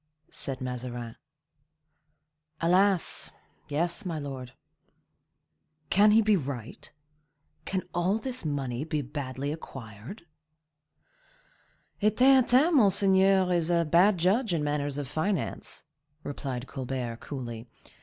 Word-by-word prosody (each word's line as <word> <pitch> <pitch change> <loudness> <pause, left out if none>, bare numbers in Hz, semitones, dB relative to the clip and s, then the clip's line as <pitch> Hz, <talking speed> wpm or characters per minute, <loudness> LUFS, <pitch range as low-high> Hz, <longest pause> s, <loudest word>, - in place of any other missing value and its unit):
said 130 -2 -4
Mazarin. 120 -2 -5 1.4
"Alas! 185 +2 +2 0.4
yes, 170 +4 -1
my 170 -4 -3
lord." 135 -3 -6 1.4
"Can 205 +3 +6
he 220 +2 +5
be 215 0 +4
right? 135 - -6 0.7
Can 190 -1 -2
all 180 +4 +1
this 255 +2 -2
money 140 -4 -2
be 150 -2 -2
badly 135 0 -4
acquired?" 130 - -9 1.8
"A 210 - +5
Theatin, 260 - +5
monseigneur, 195 -3 +4
is 170 -1 +1
a 170 -1 +2
bad 180 +6 +4
judge 190 +4 +2
in 155 - -1
matters 145 -1 -2
of 145 -2 -4
finance," 160 +4 -2 0.4
replied 135 -3 -5
Colbert, 130 -3 -4
coolly. 120 -4 -7
155 Hz, 105 wpm, -28 LUFS, 130-195 Hz, 1.8 s, Can